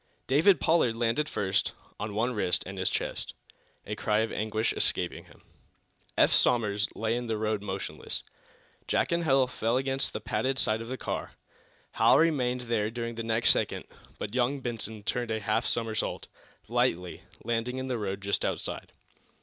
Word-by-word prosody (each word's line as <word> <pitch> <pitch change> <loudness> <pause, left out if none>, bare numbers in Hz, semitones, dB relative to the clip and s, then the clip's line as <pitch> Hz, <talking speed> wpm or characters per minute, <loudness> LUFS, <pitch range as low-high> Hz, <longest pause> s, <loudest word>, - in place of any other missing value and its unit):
David 160 +9 +5
Pollard 160 -9 +3
landed 120 +6 +1
first, 95 -2 0 0.3
on 105 0 -4
one 120 +4 +1
wrist 90 -5 +1
and 95 0 -6
his 95 - +3
chest, - - -2 0.5
a 105 - -4
cry 105 0 +1
of 110 - -1
anguish 110 +1 0
escaping - - +2
him. - - -19 0.7
Eph - - +5
Somers 105 -4 +3
lay 115 +1 0
in 120 0 -3
the 110 -1 -1
road 110 -1 0
motionless. 95 -1 -4 0.6
Jack - - +1
and 170 0 +1
Hal 135 -2 +5
fell 120 -1 0
against 135 0 0
the - - -4
padded 130 +4 -1
side 110 -3 +1
of 115 - -7
the 130 +2 -4
car. - - -4 0.6
Hal - - +5
remained 125 -6 +2
there 115 -3 0
during 115 0 -4
the 115 - -5
next 115 0 +3
second, - - 0 0.3
but 105 - -5
young 130 +3 +1
Benson 110 -4 -4
turned 120 +2 -1
a 110 0 0
half 110 +2 0
somersault, 115 -2 -1 0.4
lightly, 90 0 0 0.2
landing 120 +2 -1
in 130 0 -3
the 125 -3 -1
road 100 -1 -3
just 100 +1 +1
outside. - - -3
115 Hz, 170 wpm, -29 LUFS, 105-125 Hz, 0.7 s, David